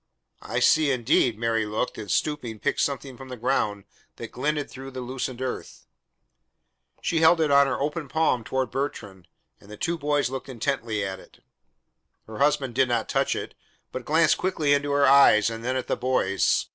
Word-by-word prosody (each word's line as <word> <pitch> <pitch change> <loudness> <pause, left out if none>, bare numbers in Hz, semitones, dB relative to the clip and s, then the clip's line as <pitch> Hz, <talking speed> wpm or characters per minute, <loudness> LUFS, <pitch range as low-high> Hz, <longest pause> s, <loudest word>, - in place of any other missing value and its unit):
"I - - -3
see 155 -2 +4
indeed." 125 -3 +2
Mary 115 -1 0
looked, 110 +4 -2
and 105 -2 -7
stooping, 140 -8 -1
picked 145 +6 -1
something 135 -2 -3
from 135 -1 -11
the 125 - -7
ground 105 -4 -1 0.3
that - - -8
glinted 145 +3 -2
through 135 +1 -9
the 130 -1 -7
loosened 130 0 -4
earth. 130 - -6 1.2
She 165 - +1
held 160 +1 +5
it 155 -3 +2
on 140 0 +6
her 130 - -2
open 150 +2 -3
palm 155 -5 +1
toward 130 +1 -2
Bertrand, 100 -10 -5 0.3
and 100 - -19
the 105 - -10
two 170 +5 -2
boys 145 -3 0
looked 135 0 -6
intently 115 -4 -2
at 95 -1 -5
it. - - -19 0.8
Her 110 -1 -9
husband 140 -3 +1
did 130 +2 +3
not 120 -2 -1
touch - - +1
it, - - -6 0.4
but 130 - -5
glanced 155 +2 +3
quickly 155 -6 +1
into 145 0 0
her 140 0 +3
eyes 130 -6 +6
and 115 0 -7
then 130 +2 -1
at 130 - -2
the - - -1
boys. 100 -8 +1
130 Hz, 185 wpm, -25 LUFS, 115-145 Hz, 1.2 s, on